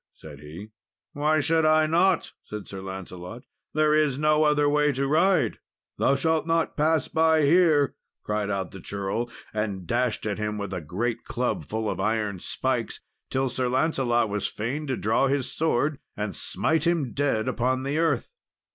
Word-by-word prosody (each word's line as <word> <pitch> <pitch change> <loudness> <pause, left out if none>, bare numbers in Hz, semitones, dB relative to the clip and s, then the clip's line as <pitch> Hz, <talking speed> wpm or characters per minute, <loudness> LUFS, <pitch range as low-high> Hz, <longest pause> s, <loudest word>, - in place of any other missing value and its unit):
said 75 -3 -12
he. 80 +8 -10 0.4
"Why 155 +1 +2
should 160 +2 +2
I 155 0 +4
not?" 170 +3 +2
said 105 -1 -7
Sir 95 -1 -7
Lancelot; 95 +3 -8 0.3
"there 155 0 +3
is 150 -4 +2
no 155 +1 +3
other 150 -1 +3
way 150 0 +3
to 135 +1 -1
ride." 170 +7 +2 0.4
"Thou 135 - +3
shalt 160 +3 +1
not 165 0 +1
pass 155 +1 +2
by 160 -1 +3
here," 155 -3 +4 0.3
cried 105 -1 -1
out 95 -3 -2
the 95 - -9
churl, 100 +6 -3 0.2
and 105 -4 -3
dashed 120 +2 0
at 105 0 -2
him 105 0 -2
with 100 -2 -4
a 90 - -3
great 115 +9 -3
club 125 0 -2
full 110 0 -3
of - - -2
iron 105 -1 -1
spikes, - - -2 0.3
till 135 0 0
Sir 125 0 -1
Lancelot 125 -4 +1
was 105 0 -2
fain 135 +8 -4
to 130 - -1
draw 110 +6 +2
his 135 -1 -1
sword 150 -2 0 0.2
and 105 -4 -3
smite 160 0 0
him 160 -8 0
dead 135 -5 0
upon 130 +1 0
the 140 +3 -1
earth. 165 - 0
130 Hz, 175 wpm, -26 LUFS, 105-155 Hz, 0.4 s, I